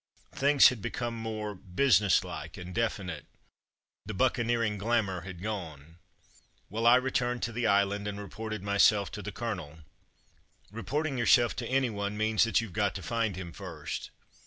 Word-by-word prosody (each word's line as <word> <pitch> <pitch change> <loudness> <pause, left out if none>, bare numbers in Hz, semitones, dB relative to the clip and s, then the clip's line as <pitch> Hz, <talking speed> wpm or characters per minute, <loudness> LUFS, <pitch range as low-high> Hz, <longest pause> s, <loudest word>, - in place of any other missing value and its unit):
Things 140 0 +6
had 125 -5 -6
become 120 +3 -3
more 110 -2 -4
businesslike 95 - +1
and 90 0 -8
definite. 100 -8 -2 0.8
The 110 - -4
buccaneering 115 -2 +1
glamour 100 -4 0
had 90 0 -9
gone. 85 -6 -6 0.7
Well, 115 +2 0
I 120 - +8
returned 125 -1 0
to 115 - -1
"the 115 0 -1
Island" 100 0 +2
and 100 0 -4
reported 110 +1 -6
myself 100 0 +3
to 105 - -6
the 105 - -6
colonel. 95 -9 -5 0.9
Reporting 135 +6 -2
yourself 120 0 +4
to 120 - -3
any 130 -2 +1
one 100 0 -3
means 110 +1 +3
that 115 -5 +2
youVe 110 -6 -7
got 100 -1 0
to 95 - -6
find 115 -5 -1
him 90 -2 -7
first. 80 -7 -6
105 Hz, 155 wpm, -29 LUFS, 95-115 Hz, 0.9 s, I